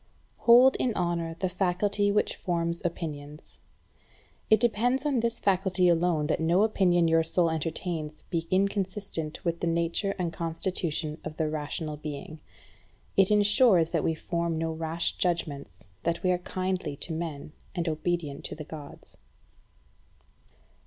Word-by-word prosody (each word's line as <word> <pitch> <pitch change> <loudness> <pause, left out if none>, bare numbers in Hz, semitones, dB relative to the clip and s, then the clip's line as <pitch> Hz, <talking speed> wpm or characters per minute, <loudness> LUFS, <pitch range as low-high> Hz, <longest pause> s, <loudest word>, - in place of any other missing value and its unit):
9. - - -24
Hold 250 +3 +8
in 240 -4 0
honour 170 -2 -1
the 185 - 0
faculty 195 +3 +1
which 210 - +1
forms 170 -2 -2
opinions. 150 -3 -6 0.9
It 220 - +6
depends 245 +4 +1
on 280 -4 +2
this 230 0 -1
faculty 190 -1 +2
alone 170 -2 +2
that 150 - 0
no 170 +5 +3
opinion 180 -6 +3
your 165 0 +4
soul 165 +1 +1
entertains 160 -1 -3
be 165 -2 -3
inconsistent 195 -4 -1
with 170 0 0
the 170 - -1
nature 170 +4 0
and 170 -3 -2
constitution 165 -2 -2
of 155 0 -7
the 160 - +1
rational 155 0 -4
being. 150 +1 -7 0.8
It 195 -1 +5
ensures 205 -4 +4
that - - 0
we 160 - +1
form 170 0 -2
no 165 0 -1
rash 160 +1 -2
judgments, 145 - -2 0.2
that 170 0 -1
we 185 - +3
are 180 - +1
kindly 185 -4 -3
to 160 - -5
men, 155 -3 -5 0.2
and 170 -1 -1
obedient 155 -2 -2
to - - -5
the 155 - -7
Gods. 150 -2 -11
170 Hz, 145 wpm, -28 LUFS, 160-190 Hz, 0.9 s, Hold